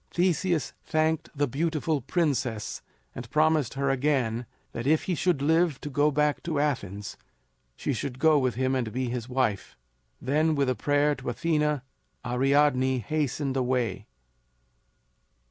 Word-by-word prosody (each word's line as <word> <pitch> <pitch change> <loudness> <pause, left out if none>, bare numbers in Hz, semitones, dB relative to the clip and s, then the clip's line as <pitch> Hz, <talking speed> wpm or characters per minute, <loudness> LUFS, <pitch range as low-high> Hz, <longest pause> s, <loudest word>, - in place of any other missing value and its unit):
"] - - -42
Theseus 175 -2 0
thanked 160 0 0
the 145 0 +2
beautiful 155 +2 -1
princess 135 - -1 0.3
and 120 -2 -8
promised 155 -4 +2
her 140 0 +1
again 125 -4 0 0.2
that 120 +2 -4
if 155 +1 +3
he 185 - -1
should 170 -3 +1
live 160 -1 +2
to 145 - -6
go 145 +2 +3
back 150 0 +1
to 160 -4 -2
Athens 105 -9 -2 0.6
she - - -2
should 130 -3 -4
go 155 +1 +4
with 130 -4 0
him 130 +1 0
and 125 -4 -1
be 130 +1 -2
his 120 0 -4
wife. 125 -6 -1 0.4
Then 155 +4 +1
with 140 -2 +1
a - - -1
prayer 145 +2 +2
to 140 - -5
Athena, 150 +1 0 0.4
Ariadne 130 +1 +2
hastened 140 +2 -2
away. 125 -6 -1
140 Hz, 145 wpm, -27 LUFS, 125-155 Hz, 0.6 s, go